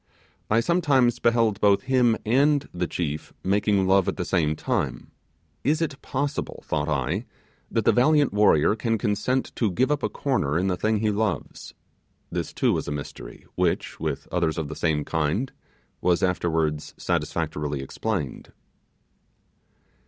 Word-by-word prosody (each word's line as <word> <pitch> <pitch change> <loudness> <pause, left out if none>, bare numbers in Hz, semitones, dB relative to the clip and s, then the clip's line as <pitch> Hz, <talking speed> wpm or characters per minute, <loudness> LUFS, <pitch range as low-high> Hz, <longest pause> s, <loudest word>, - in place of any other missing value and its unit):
I 110 +2 +4
sometimes 140 -6 +2
beheld 115 -3 +2
both 100 -1 +4
him 125 -3 +3
and 140 +5 +3
the 90 0 -1
chief 75 -4 -4
making 100 0 +2
love 95 0 +4
at - - -1
the 90 - -2
same 80 -5 +1
time. - - -2 0.5
Is 150 +4 +2
it 150 -4 -3
possible, 145 +1 -3
thought 75 0 -1
I, 65 -3 -1 0.4
that - - 0
the - - +6
valiant 145 +2 +3
warrior 105 -3 +4
can 115 0 0
consent 120 +5 -1
to 110 - +2
give 130 +11 +1
up 150 - +1
a - - 0
corner 80 - 0
in 90 - +1
the 90 - +1
thing 110 +3 0
he 110 -1 +2
loves? 105 -1 -3 0.6
This - - -3
too - - +1
was - - -2
a - - -2
mystery 75 -1 -7
which, - - -1
with 75 -3 -3
others 85 -2 0
of 80 -3 -3
the 80 - -6
same 75 -3 0
kind, 80 - -1 0.5
was 90 0 +2
afterwards 80 -4 0
satisfactorily 75 -2 -2
explained. 70 0 -4
100 Hz, 150 wpm, -25 LUFS, 80-125 Hz, 0.6 s, the